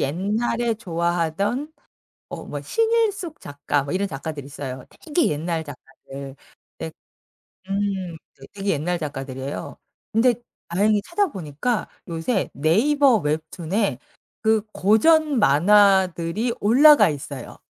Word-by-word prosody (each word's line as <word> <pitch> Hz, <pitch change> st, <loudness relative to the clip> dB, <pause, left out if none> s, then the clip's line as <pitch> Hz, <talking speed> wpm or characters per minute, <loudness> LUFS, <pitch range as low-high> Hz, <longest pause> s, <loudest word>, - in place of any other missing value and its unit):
옛날에 220 Hz, -, 0 dB
좋아하던 185 Hz, -, -1 dB, 0.6 s
어 -, -, -7 dB
뭐 -, -, -6 dB
신일숙 445 Hz, -7 st, 0 dB
작가 145 Hz, 0 st, -2 dB
뭐 140 Hz, -, -5 dB
이런 195 Hz, +2 st, 0 dB
작가들이 145 Hz, -1 st, -6 dB
있어요, 135 Hz, -2 st, -7 dB, 0.2 s
되게 320 Hz, +1 st, +1 dB
옛날 160 Hz, +2 st, -2 dB
작가들. 135 Hz, -1 st, -10 dB, 0.4 s
근데 80 Hz, 0 st, -5 dB, 0.8 s
음 195 Hz, -3 st, -2 dB, 0.2 s
되 135 Hz, -, -14 dB
되게 200 Hz, 0 st, -3 dB
옛날 170 Hz, +4 st, -1 dB
작가들이에요. 135 Hz, -2 st, -6 dB, 0.3 s
근데 235 Hz, +2 st, +3 dB, 0.3 s
다행히 205 Hz, +4 st, +2 dB
찾아보니까 235 Hz, -, -2 dB, 0.2 s
요새 170 Hz, +6 st, -1 dB
네이버 245 Hz, -, +3 dB
웹툰에 160 Hz, -, -2 dB, 0.4 s
그 220 Hz, -1 st, +3 dB
고전 290 Hz, -, +3 dB
만화들이 190 Hz, -, +3 dB
올라가 275 Hz, -, +6 dB
있어요. 145 Hz, -2 st, -7 dB
190 Hz, 255 characters per minute, -23 LUFS, 150-230 Hz, 0.8 s, 올라가